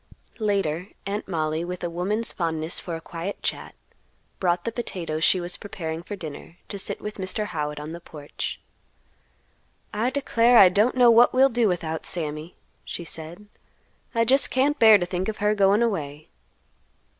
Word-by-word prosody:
Later 195 -5 0 0.2
Aunt 205 +2 -3
Mollie, 160 -2 -1
with 180 +1 -6
a - - 0
woman's 205 +6 -1
fondness 160 -1 -2
for 170 - -5
a 165 - -7
quiet 170 +4 -6
chat, - - -4 0.6
brought 175 -1 +1
the 230 - -2
potatoes 170 -9 -4
she 185 - +4
was 175 0 -3
preparing 165 -5 -5
for 205 +4 -6
dinner, 165 -1 -9
to 200 - -5
sit - - -3
with 210 0 -6
Mr. 190 +3 -2
Howitt 150 -5 -3
on 150 +2 -7
the 170 +1 -8
porch. 150 -3 -6 1.3
"I 220 +4 +1
declare 245 -3 +3
I 190 - +9
don't 210 +7 +2
know 245 -2 +7
what 235 +1 +6
we'll 265 +1 +6
do 235 -2 +2
without 165 -4 -2
Sammy," 155 0 -4 0.3
she 170 - -6
said; 165 +5 -7 0.7
"I 230 0 +3
just 270 +4 +4
can't 285 +3 +1
bear 220 -2 +8
to 175 - -2
think 180 +1 -3
of 215 - -4
her 210 +1 +2
goin' 205 +2 +4
away." 155 -9 -3
180 Hz, 170 wpm, -25 LUFS, 165-215 Hz, 1.3 s, I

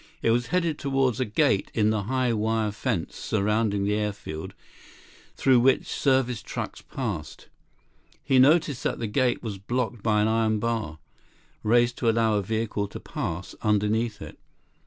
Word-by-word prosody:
It 115 - +3
was 120 +1 +1
headed 170 -4 0
toward 135 -3 +1
a - - +2
gate 105 -2 +1
in 110 -1 +3
the 105 -3 -1
high 130 0 +1
wire 110 0 0
fence 105 -5 -3
surrounding 105 -1 0
the 100 +1 +1
airfield 105 -7 -4 0.8
through 130 -2 +4
which 130 +2 +3
service 130 -4 +1
trucks - - -6
passed. - - -6 0.7
He 135 -2 +3
noticed 145 0 +4
that - - -1
the 115 - -3
gate 120 +4 0
was 105 -4 -5
blocked 120 +2 -2
by 105 -1 +2
an - - +2
iron 110 -1 +2
bar, 110 -9 -2 0.6
raised 120 +2 +3
to 115 - +2
allow 115 -1 +2
a 105 - +2
vehicle 110 0 -2
to - - -8
pass 85 +3 -5
underneath 105 +1 0
it. - - -11
115 Hz, 155 wpm, -26 LUFS, 105-125 Hz, 0.8 s, through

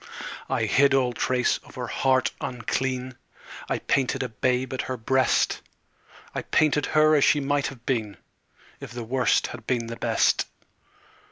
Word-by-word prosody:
I - - 0
hid 140 +1 +4
all 125 -2 +2
trace 125 +1 +1
of 145 - -17
her 125 -2 -4
heart 130 +2 +1
unclean; 130 +1 -3 0.5
I - - +1
painted 135 0 0
a 125 - -4
babe 125 +3 -1
at 130 - -1
her 130 - -4
breast; 130 +3 +1 0.7
I - - -2
painted 150 -1 +2
her 155 0 +6
as 145 -2 +4
she 150 - +4
might 145 0 0
have 120 -4 -10
been 110 -6 -1 0.6
If - - -9
the 120 -1 -5
Worst 125 +2 +2
had 115 -2 -11
been 120 -3 0
the 115 0 -6
Best. - - +2
130 Hz, 160 wpm, -25 LUFS, 120-135 Hz, 0.7 s, her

